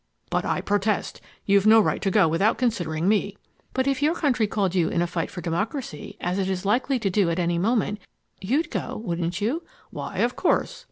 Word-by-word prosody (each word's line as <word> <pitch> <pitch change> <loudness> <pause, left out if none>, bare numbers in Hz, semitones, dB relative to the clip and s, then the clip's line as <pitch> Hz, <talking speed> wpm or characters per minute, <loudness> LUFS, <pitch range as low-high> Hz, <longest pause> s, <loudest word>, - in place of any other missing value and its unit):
"But - - 0
I - - 0
protest. 205 0 -1 0.2
You've 200 +1 +4
no 220 +1 +8
right 215 - +1
to 195 - +1
go 170 - +4
without 165 +7 +2
considering 175 -9 -1
me." 205 -1 +1 0.3
"But 260 0 0
if 275 -1 0
your 310 +4 +2
country 255 -9 +1
called 200 -3 0
you 175 -4 +2
in - - -1
a 175 - +2
fight 170 -1 -3
for 180 - -7
democracy, 180 - -4
as 180 +2 -1
it 190 -1 0
is 190 0 -3
likely 255 +6 +2
to 210 -5 -1
do 190 -2 +2
at 165 - -1
any 170 -1 0
moment, 210 +1 0 0.4
you'd 285 - 0
go, - - -3
wouldn't 175 +1 -2
you?" 255 +11 0 0.3
"Why, - - -6
of - - +1
course." - - 0
200 Hz, 210 wpm, -25 LUFS, 175-230 Hz, 0.4 s, no